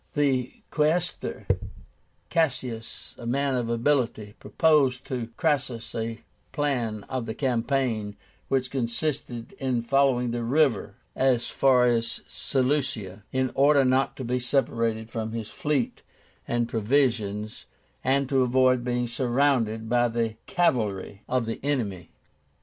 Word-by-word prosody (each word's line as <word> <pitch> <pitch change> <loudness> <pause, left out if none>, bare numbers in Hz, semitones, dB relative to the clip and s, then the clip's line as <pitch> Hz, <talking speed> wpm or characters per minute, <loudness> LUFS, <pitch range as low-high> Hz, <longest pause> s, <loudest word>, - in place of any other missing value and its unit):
The 135 -4 0
Quaestor, 160 +4 0 0.9
CASSIUS, 130 -8 -2
a 115 - -6
man 140 +2 +1
of 120 -2 -1
ability, 115 -4 0
proposed 145 -6 +2
to 120 -3 -4
Crassus 125 -7 -1
a 115 0 -3 0.3
plan 120 -8 -1
of 130 -3 -4
the 110 - -4
campaign, 120 -5 0 0.3
which 130 -2 0
consisted 125 0 -3
in 130 -4 0
following 125 -1 +2
the 120 0 -2
river 140 +2 +2 0.2
as 130 -3 +2
far 130 -2 +4
as 115 -1 0
Seleucia, 125 -8 -1
in 130 -1 0
order 140 0 +5
not 130 +1 +2
to 130 - -5
be 125 +1 0
separated 115 -3 0
from 110 -1 -3
his 110 -2 -5
fleet 145 -5 -1 0.5
and 120 0 0
provisions, 110 -3 0 0.4
and 135 +1 +2
to 135 0 +2
avoid 130 0 +3
being 125 0 0
surrounded 120 -2 +1
by 120 +1 +3
the 115 -1 -1
cavalry 105 - 0
of 125 -2 +1
the 115 - -4
enemy. 110 - -2
125 Hz, 125 wpm, -26 LUFS, 115-135 Hz, 0.9 s, order